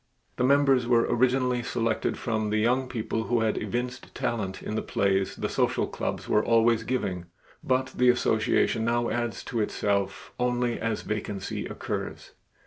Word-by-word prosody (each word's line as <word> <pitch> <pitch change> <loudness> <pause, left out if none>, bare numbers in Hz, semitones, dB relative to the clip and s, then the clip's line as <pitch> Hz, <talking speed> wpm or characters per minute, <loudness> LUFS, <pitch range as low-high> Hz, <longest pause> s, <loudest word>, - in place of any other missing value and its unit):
The - - +1
members 135 -2 +4
were 120 -1 +4
originally 125 0 +2
selected 115 -2 -1
from 110 -2 -1
the 105 - +1
young 125 +4 +1
people 110 -1 -2
who 120 -1 +1
had 110 -1 +1
evinced 125 +1 -4
talent 105 -5 -2
in - - -4
the 110 - 0
plays 95 -1 0
the - - -2
social - - +1
clubs - - -4
were 105 - +3
always 115 0 +4
giving, 95 -7 -2 0.4
but 130 0 0
the 125 0 +4
association 110 -1 +2
now 120 +1 +1
adds 120 -3 -2
to 115 - -3
itself 100 -2 -1
only 125 -1 0
as 115 -1 -2
a - - -14
vacancy 105 -2 -3
occurs. - - -5
115 Hz, 160 wpm, -27 LUFS, 110-125 Hz, 0.4 s, members